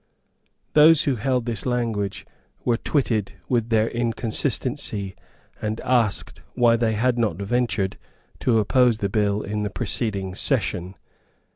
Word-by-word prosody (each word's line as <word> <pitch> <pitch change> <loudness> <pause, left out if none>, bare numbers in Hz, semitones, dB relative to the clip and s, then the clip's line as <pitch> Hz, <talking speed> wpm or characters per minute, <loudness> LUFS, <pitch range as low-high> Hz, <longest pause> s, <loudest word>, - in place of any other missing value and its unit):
Those 155 +1 +7
who 135 -4 0
held 125 +2 0
this 115 -4 -3
language 115 -6 -2 0.4
were 120 - +3
twitted 115 -8 0
with 120 -2 0
their 110 -1 +3
inconsistency, 115 -2 -2 0.5
and 110 +1 -2
asked 120 -5 0
why 120 -2 +4
they 115 -1 +1
had 120 +3 +1
not 110 -8 +1
ventured 100 -2 -1 0.4
to 120 -3 +2
oppose 120 +2 +3
the 100 -2 -2
bill 105 0 0
in 105 +1 -3
the 105 - -1
preceding 100 -2 -2
session. 90 0 -1
115 Hz, 130 wpm, -23 LUFS, 105-125 Hz, 0.5 s, Those